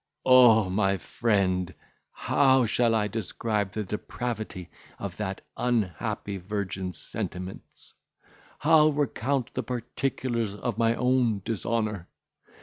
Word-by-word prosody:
O 120 -5 +7
my 95 +1 +1
friend! 95 +1 0 0.4
how 130 -2 +3
shall 115 +1 +2
I 105 -1 +1
describe 105 0 -2
the 110 - -3
depravity 105 - -5 0.3
of 100 -3 -6
that 95 -2 -4 0.2
unhappy 100 -3 -1
virgin's 95 -1 -4
sentiments! 90 +1 -6 0.6
how 155 0 +5
recount 140 -3 -1
the - - -1
particulars 120 -3 -2
of 115 0 -3
my 115 0 +3
own 125 -6 +1
dishonour! 110 -4 -2
110 Hz, 105 wpm, -27 LUFS, 100-120 Hz, 0.6 s, O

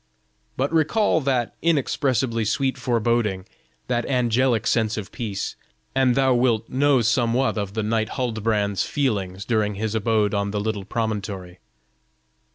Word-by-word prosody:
But 140 +5 -1
recall 160 +2 +2
that 130 -4 0
inexpressibly 130 -7 +1
sweet 130 +5 0
foreboding, 115 -6 0 0.4
that 120 -1 0
angelic 125 -2 +2
sense 110 -2 +1
of 105 -3 -6
peace, 105 -5 -4 0.4
and 130 -2 +3
thou 135 -1 +3
wilt 120 -3 +2
know 140 0 +3
somewhat 120 +3 +2
of 100 -1 -4
the 110 - -1
knight 110 0 0
Huldbrand's 110 -5 0
feelings 100 -9 -1
during 105 -3 0
his 110 +1 -2
abode 110 -1 +1
on 100 0 0
the 105 0 -2
little 105 -2 -3
promontory. 100 -5 -4
115 Hz, 135 wpm, -23 LUFS, 105-130 Hz, 0.4 s, and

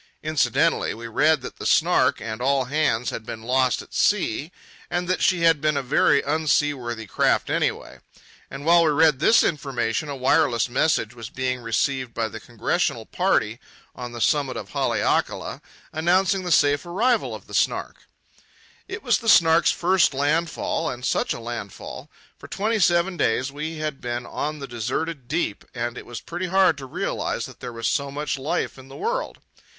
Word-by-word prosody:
Incidentally, 155 -1 +1
we 115 +1 -9
read 150 +6 +2
that - - -8
the - - -7
Snark - - +3
and 110 +1 -6
all 135 0 +2
hands 135 -4 0
had 115 - -6
been 110 0 -8
lost 125 0 +1
at - - -19
sea, 175 - +1 0.4
and 175 0 -2
that 185 - 0
she 180 -2 +2
had 165 -3 +4
been 150 -1 +1
a 140 - -1
very 140 +1 +3
unseaworthy 145 -6 0
craft - - +1
anyway. - - -2 0.5
And 135 +1 -8
while 170 +1 +6
we 160 - +3
read 150 -2 +4
this 225 - +5
information 135 -2 -1
a 140 - -4
wireless 130 -3 +2
message 120 -3 +1
was 115 -2 -8
being 130 -1 -2
received 125 +2 -1
by 115 -1 -1
the - - -8
congressional - - -2
party - - 0 0.3
on 125 -1 -7
the 120 - -7
summit 140 -5 +1
of 100 -3 -7
Haleakala - - -1 0.3
announcing 185 +4 +2
the 175 - -2
safe 145 -2 +4
arrival 220 +7 0
of - - -11
the - - -14
Snark. - - -1 0.8
It 415 - -7
was 240 -6 +2
the 225 - -1
Snark's 165 -3 +6
first 180 -5 +2
landfall—and 150 -2 -1
such - - 0
a - - -3
landfall! 115 -4 -7 0.3
For - - -11
twenty 220 +2 -1
seven 175 0 +2
days 130 +1 +1
we 155 +3 -5
had 155 -3 -4
been 120 0 -4
on 150 +1 -4
the 140 -2 -7
deserted 125 +4 -3
deep, 150 -7 -2
and 120 0 -3
it - - -9
was 120 - -7
pretty 175 +2 -4
hard 185 -2 +4
to 135 - -8
realize - - -2
that - - -12
there 125 - -6
was 115 -1 -6
so 140 0 0
much 145 0 -3
life 150 0 -2
in 130 - -13
the 135 - -11
world. - - -2
145 Hz, 175 wpm, -23 LUFS, 125-165 Hz, 0.8 s, while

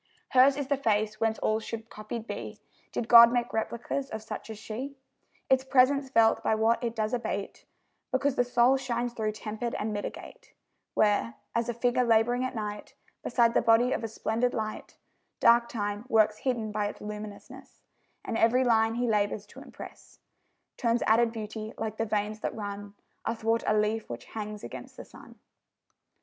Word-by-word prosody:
Hers 265 +2 +5
is 285 - -2
the 280 +1 0
face 215 -4 0
whence 225 -1 +1
all 215 0 0
should 225 0 -7
copied 215 +2 -6
be, - - -6 0.3
Did 225 - -3
God 235 0 +9
make 240 -1 -1
replicas 235 +4 -2
of 220 0 -6
such 220 - -7
as 220 - -7
she; 250 +6 -6 0.5
Its 265 0 +3
presence 270 +1 +3
felt 230 -3 +4
by 220 - +2
what 225 +3 +2
it 235 -1 -2
does 215 0 -1
abate, 220 -4 -4 0.5
Because 275 +1 +1
the 245 - +2
soul 245 +2 +3
shines 245 -2 -2
through 215 -2 -2
tempered 220 +2 -4
and 215 +1 -2
mitigate: 205 - -7 0.4
Where 205 - +2 0.2
as 230 +1 0
a - - 0
figure 245 +1 +2
labouring 240 +2 +3
at 255 0 -3
night 210 -1 -5 0.3
Beside 235 -1 +3
the - - +3
body 230 +2 +4
of - - -1
a - - -1
splendid 225 +2 -1
light 215 -1 -5 0.4
Dark 235 0 +5
Time 205 0 -3
works 215 -2 +3
hidden 235 -5 -1
by 210 0 -1
its - - -7
luminousness; 210 +6 -9 0.4
And 225 - -2
every 245 +3 +4
line 225 -2 +3
he 245 +1 0
labours 205 -1 0
to - - -13
impress - - -12 0.6
Turns 235 -1 +1
added 230 +1 +4
beauty, 220 -1 -6
like 220 -1 -4
the 225 - -1
veins 210 0 -1
that - - -3
run 205 -1 -6 0.3
Athwart 225 0 0
a 215 - +3
leaf 215 +1 0
which 120 0 -7
hangs 210 -1 -6
against - - -9
the - - -9
sun. - - -15
225 Hz, 175 wpm, -28 LUFS, 215-245 Hz, 0.6 s, God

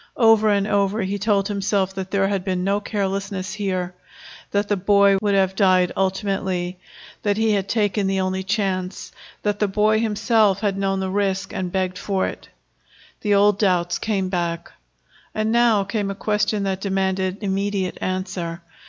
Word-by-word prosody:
Over 225 -2 +5
and 200 -1 +2
over 200 +1 +1
he 200 +2 -2
told 200 -1 +1
himself 195 -2 0
that 190 -1 -5
there 195 0 +1
had 195 -2 -1
been 185 -1 -1
no 200 +2 +1
carelessness 195 -2 -3
here, 185 -4 -2 0.6
that 200 0 0
the 205 - +1
boy 200 +1 +4
would 205 -1 +1
have 190 -1 +2
died 185 -2 +3
ultimately, 190 -2 -1 0.4
that 205 -1 0
he 220 0 +2
had 200 -1 0
taken 205 -2 +1
the 195 0 0
only 190 0 -1
chance, 190 -2 -2 0.3
that 205 -1 0
the 210 - +2
boy 215 +2 +2
himself 215 -2 +2
had 205 -3 0
known 195 -1 -1
the 190 0 -2
risk 195 -1 -1
and 180 -1 -3
begged 185 -1 -1
for 195 -2 -1
it. - - -7 0.7
The 205 -2 +1
old 205 0 +4
doubts 180 -4 +1
came 200 -4 -1
back. 170 -2 -3 0.6
And 215 +1 0
now 235 -3 +4
came 200 0 -2
a 195 - -4
question 210 0 0
that 190 -1 -2
demanded 190 -1 -1
immediate 195 -1 -1
answer. 185 -2 -3
195 Hz, 170 wpm, -22 LUFS, 190-205 Hz, 0.7 s, Over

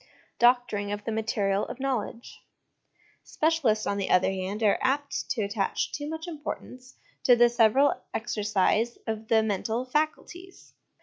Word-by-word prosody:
Doctoring 240 -4 +2
of 205 0 -4
the 225 - -3
Material 210 -3 0
of - - -8
Knowledge. 250 -3 -4 0.8
Specialists, 295 -10 +1
on 200 - -1
the 195 - -2
other 180 +1 +3
hand, 195 +3 -4
are 205 - +3
apt 280 +2 -1
to 225 - -1
attach 200 0 -1
too 290 0 -5
much 320 +2 -6
importance 265 -5 -7 0.3
to 245 - +6
the 240 0 +5
several 240 +4 +4 0.2
exercise 215 +1 0
of 220 -1 -4
the 220 -1 +3
mental 220 +3 -2
' 255 - -25
faculties.' 350 +4 -3
230 Hz, 145 wpm, -27 LUFS, 210-265 Hz, 0.8 s, to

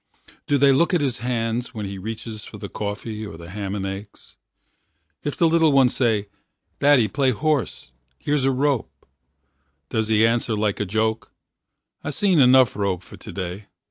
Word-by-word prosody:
Do 145 - +3
they 140 0 +5
look 170 +7 +3
at 170 - +2
his 130 -6 -1
Hands 120 0 -2
when 105 -2 -4
he 100 0 -6
reaches 110 +1 -6
for - - -10
the - - -7
coffee 105 +1 -5
Or 100 -6 -8
the 85 +1 -11
ham 100 0 -4
and 95 -1 -3
eggs? 100 +2 -8 0.9
If 145 - -3
the 170 - +4
little 165 -1 +4
Ones 130 -2 +4
say, 110 -5 +1 0.5
Daddy, 140 -6 +5
play 135 +1 +1
horse, 140 - -1 0.3
here's 145 -2 0
A - - +4
rope 135 -2 -1 0.8
does 110 -1 0
he 110 0 +4
answer 115 -1 +1
like 105 -1 -1
a 105 - 0
joke: 110 +3 -1 0.7
I - - -3
seen 185 +2 +2
enough 130 -3 +6
rope 95 -3 -1
for - - -13
today? 95 +2 -7
115 Hz, 175 wpm, -23 LUFS, 105-135 Hz, 0.9 s, enough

